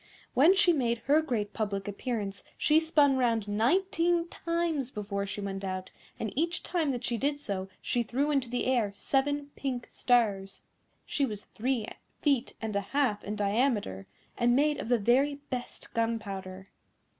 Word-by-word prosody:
When 320 +9 +6
she 380 -3 +5
made 240 -6 +1
her 295 +3 +5
great 220 -9 -2
public 200 -3 -2
appearance 205 -1 -3
she 310 +1 +4
spun 295 -4 +3
round 230 -4 +1
nineteen 335 - +2
times 335 -7 -1
before 200 -3 -3
she 205 - -5
went 195 -1 -4
out, 185 -1 -4 0.3
and 220 - -3
each 335 +5 0
time 340 -4 0
that 245 -3 -2
she 235 -2 -1
did 285 +1 0
so 195 -7 -4
she 245 - +1
threw 270 +6 0
into 270 -4 +1
the 245 +1 -1
air 240 -6 +2
seven 285 +5 0
pink 255 -3 -3
stars. 205 -6 +1 0.4
She 285 - -1
was 210 -6 -2
three 245 -1 -1 0.3
feet 275 -4 +1
and 220 -2 -4
a 200 - +2
half 230 0 0
in 210 - -4
diameter, 205 - 0 0.3
and 240 0 +4
made 295 +2 +2
of - - -5
the 245 - +4
very 255 +7 +3 0.2
best 250 -1 -6
gunpowder. 195 -5 -3
240 Hz, 165 wpm, -30 LUFS, 205-285 Hz, 0.4 s, When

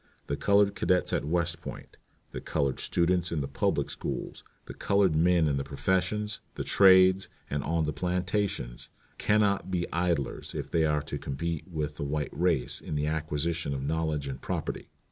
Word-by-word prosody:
The 70 - -2
colored 100 +6 +3
cadets 90 -2 +1
at - - 0
West 85 +1 -1
Point, - - -9 0.4
the - - -6
colored 70 -4 -1
students 90 0 +1
in 85 - 0
the 70 - -3
public 70 - 0
schools, - - -5 0.2
the - - -8
colored 100 -5 +2
men 85 0 +4
in 70 -2 +1
the 70 - -1
professions, 95 +8 -1 0.2
the - - -3
trades, 95 0 +6 0.2
and 70 0 -1
on 80 +2 0
the 75 - -2
plantations, 90 - -2 0.3
can 105 +1 +3
not 100 -3 +1
be 90 -2 0
idlers 85 -5 -1
if - - -5
they 80 -1 +3
are 75 -1 +1
to - - -5
compete 80 +4 -3
with 75 -4 -4
the 75 - -3
white 75 +1 -2
race 80 -6 0
in - - -5
the 75 0 0
acquisition 80 0 -1
of 65 - -4
knowledge 80 -2 -1
and 65 -2 -6
property. - - -4
85 Hz, 180 wpm, -29 LUFS, 75-90 Hz, 0.4 s, trades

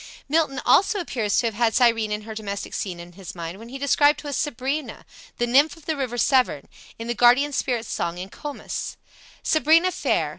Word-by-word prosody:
Milton 300 -2 +1
also 400 +2 +4
appears 235 - -1
to 245 - +2
have 225 - 0
had 225 +1 +1
Cyrene 230 -3 +3
and 210 0 -3
her 220 0 -7
domestic 200 -2 -5
scene 180 -4 -4
in 170 +1 -10
his 185 0 -10
mind 170 +2 -6
when 230 +1 -11
he 265 - -7
describes 290 +1 +3
to 290 - -5
us 280 - -2
Sabrina, 280 +1 -3 0.3
the 240 - +1
nymph 280 +6 +3
of 325 - -18
the 320 - -1
river 255 -4 -3
Severn, 250 - +2 0.3
in 230 - -6
the 240 - -1
Guardian 245 +5 +4
spirit's 240 -4 -1
Song 170 +1 -2
in 185 +2 -6
"Comus": 290 +6 -6 0.5
"Sabrina 320 +4 +4
fair! - - 0
245 Hz, 200 wpm, -24 LUFS, 215-290 Hz, 0.5 s, also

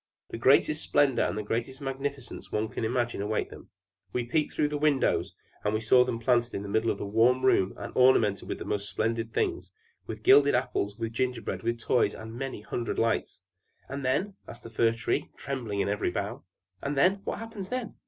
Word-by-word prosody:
The - - -4
greatest 145 +5 +4
splendor 140 -3 +2
and - - 0
the 105 - -2
greatest 120 +5 -3
magnificence 135 -1 -5
one 110 +1 -1
can - - -5
imagine 120 -1 -1
await 105 +1 -2
them. - - -12 0.4
We 125 -1 -1
peeped 150 +5 0
through 150 - +1
the 150 -1 -3
windows, 145 -3 +1 0.3
and 110 +2 0
saw 125 +3 +6
them 120 -2 -2
planted 120 0 +1
in 100 - -3
the 100 - -6
middle 110 +2 +1
of - - 0
the - - -5
warm 120 +5 +3
room 95 -7 +3
and - - -7
ornamented 115 -6 +4
with - - -2
the - - -7
most 100 0 -2
splendid 115 +4 -1
things, - - -1 0.4
with 110 -1 -7
gilded 140 +3 +6
apples, 105 -5 -1
with 115 -1 -4
gingerbread, 125 -1 -2
with 115 0 -1
toys, 115 -2 +1
and 110 0 -8
many 130 -2 -5
hundred 115 +2 -3
lights!" 115 -3 0 0.5
"And 140 +1 -5
then?" 180 +11 0
asked 120 - -10
the 115 - -10
Fir 115 0 +3
Tree, 115 0 -2
trembling 120 -6 -3
in - - 0
every 105 -1 0
bough. 100 +5 -4 0.4
"And 140 0 -3
then? 190 +7 +3
What - - -2
happens 220 -4 -7
then?" 250 -3 -3
120 Hz, 205 wpm, -28 LUFS, 110-135 Hz, 0.5 s, saw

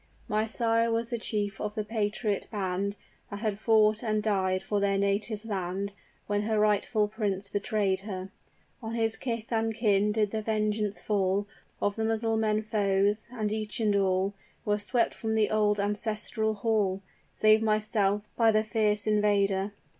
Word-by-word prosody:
"My 215 +1 0
sire 230 0 +1
was 230 +1 -1
the 235 - -1
chief 205 -2 -3
of 210 0 -3
the 215 - -1
patriot 210 -1 -1
band, 200 -1 -2 0.3
That 205 0 -6
had 210 -3 -1
fought 215 -1 +4
and 215 -3 0
died 190 -3 +1
for 205 - -1
their 200 0 +1
native 205 +2 -1
land, 195 -1 -3 0.3
When 205 0 0
her 215 0 0
rightful 210 +1 +2
prince 205 -2 -2
betrayed 200 -1 0
her; 190 -2 -6 0.5
On 225 0 -4
his 225 -1 +1
kith 230 -3 -4
and 225 0 0
kin 210 -2 +2
did 210 -1 +1
the 220 - -2
vengeance 215 -1 0
fall 200 -1 0 0.3
Of 205 +1 0
the 225 - -1
Mussulman 220 -1 +1
foes 205 0 +1
and 215 -4 -2
each 215 0 -3
and 210 -2 +2
all 190 0 +1 0.3
Were 210 0 +1
swept 230 +3 +1
from 220 -1 -2
the 215 -1 +2
old 210 -1 +2
ancestral 215 +1 -1
hall, 200 -3 0 0.3
Save 215 0 +4
myself, 215 -2 +1
by 230 -1 +4
the 215 0 +2
fierce 215 -1 +1
invader! 205 -2 +2
210 Hz, 160 wpm, -28 LUFS, 200-220 Hz, 0.5 s, fought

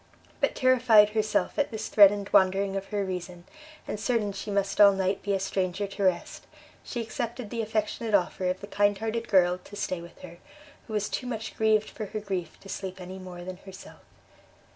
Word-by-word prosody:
But - - +1
terrified 245 -5 +5
herself 215 +4 0
at 285 - +2
this 220 -2 -5
threatened 200 -1 +5
wandering 195 +1 +3
of 195 0 -4
her 205 -2 -2
reason, 180 -1 -6 0.4
and 210 - -4
certain 220 -3 0
she 200 +2 -7
must 200 0 0
all 200 -1 +9
night 190 0 -1
be 200 - -1
a - - -1
stranger 190 0 -1
to 200 0 -5
rest, 185 -2 -1 0.4
she 240 - -4
accepted 230 0 -5
the 230 - -2
affectionate 220 0 -1
offer 185 -1 0
of 185 +1 -3
the - - -6
kind 205 0 +2
hearted 225 +2 -3
girl 180 -2 +3
to 205 - -13
stay 185 -3 -3
with 170 0 -13
her, 170 -1 -11 0.5
who 220 - -7
was 210 -1 0
too 250 - -4
much 225 -3 -5
grieved 220 -1 +2
for 215 - -6
her 215 +2 -4
grief 190 -5 -5
to - - -13
sleep 190 -1 -6
any 185 +1 -8
more 180 -1 -9
than 185 0 -7
herself. 190 0 -13
200 Hz, 200 wpm, -27 LUFS, 185-215 Hz, 0.5 s, all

